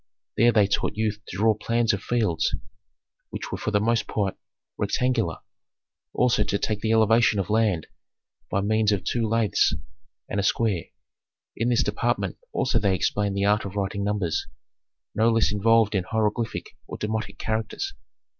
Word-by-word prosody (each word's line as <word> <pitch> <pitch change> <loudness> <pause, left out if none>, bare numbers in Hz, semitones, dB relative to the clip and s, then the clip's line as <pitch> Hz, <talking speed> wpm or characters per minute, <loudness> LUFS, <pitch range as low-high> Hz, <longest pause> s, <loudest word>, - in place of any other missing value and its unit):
There 120 +2 +5
they 105 -3 +4
taught 100 - -1
youth 110 -1 -1
to 90 - -7
draw 110 +2 +4
plans 115 +2 +1
of 100 - -2
fields 110 -10 0 0.7
which - - -6
were - - -2
for - - -2
the 105 -1 +2
most 115 +2 +1
part 100 -3 -1 0.4
rectangular, 120 -9 0 0.7
also 125 -4 +2
to 100 - -1
take 105 0 -1
the 110 - 0
elevation 115 0 +4
of 95 +1 -2
land 105 -7 +2 0.6
by 100 - 0
means 110 +1 +2
of 100 -3 0
two 115 -2 0
laths 110 -8 +2 0.5
and 100 - -2
a - - 0
square. 100 -4 +1 0.7
In 115 +2 0
this 125 +1 +3
department - - -1
also 120 - +1
they 100 -3 +2
explained 100 +2 0
the 100 - +1
art 105 +1 +3
of 100 0 -7
writing 100 0 -2
numbers 100 -5 -1 0.7
no 110 +2 +3
less 115 -2 +3
involved 110 +1 +3
in 95 -3 0
hieroglyphic 110 +2 -2
or - - -6
demotic 110 -1 -3
characters. 110 0 -3
105 Hz, 165 wpm, -25 LUFS, 100-115 Hz, 0.7 s, There